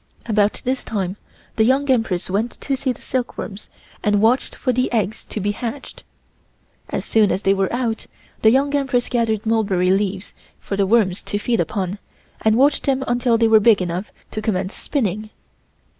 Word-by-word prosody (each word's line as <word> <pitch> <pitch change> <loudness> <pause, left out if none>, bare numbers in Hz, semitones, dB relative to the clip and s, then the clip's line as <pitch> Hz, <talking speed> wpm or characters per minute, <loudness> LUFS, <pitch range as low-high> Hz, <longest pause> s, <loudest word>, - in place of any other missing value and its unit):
About 210 -2 +1
this 260 +1 0
same - - -14
time 195 -3 -2 0.4
the 220 - +5
Young 265 +4 +2
Empress 225 -8 0
went 210 +5 -1
to 275 - -1
see 260 0 -1
the - - -9
silkworms 235 -5 -4 0.3
and 205 -1 +3
watch 230 +5 +3
for 255 - -2
the 255 +1 0
eggs 220 -3 -1
to - - -5
be 205 +1 0
hatched. 240 +5 -6 0.9
As - - -3
soon 215 -3 +3
as 195 - -1
they 195 - +4
were 195 -1 0
out, 235 -2 -2 0.3
the 220 - +6
Young 275 +4 +2
Empress 265 -4 +1
gathered 230 -3 0
mulberry 200 -5 +2
leaves 195 0 -1 0.3
for 200 - -4
the 195 -1 +1
worms 205 -4 +2
to 205 - -3
feed 230 +2 0
upon 195 -1 -2 0.4
and 220 0 +3
watched 285 +3 +3
them 265 -1 +2
until 240 -1 +2
they 230 0 +3
were 220 -1 +6
big 215 -1 +5
enough 180 +2 -3 0.2
to 215 - -4
commence 190 -3 -1
spinning. 215 - -2
220 Hz, 185 wpm, -21 LUFS, 200-245 Hz, 0.9 s, the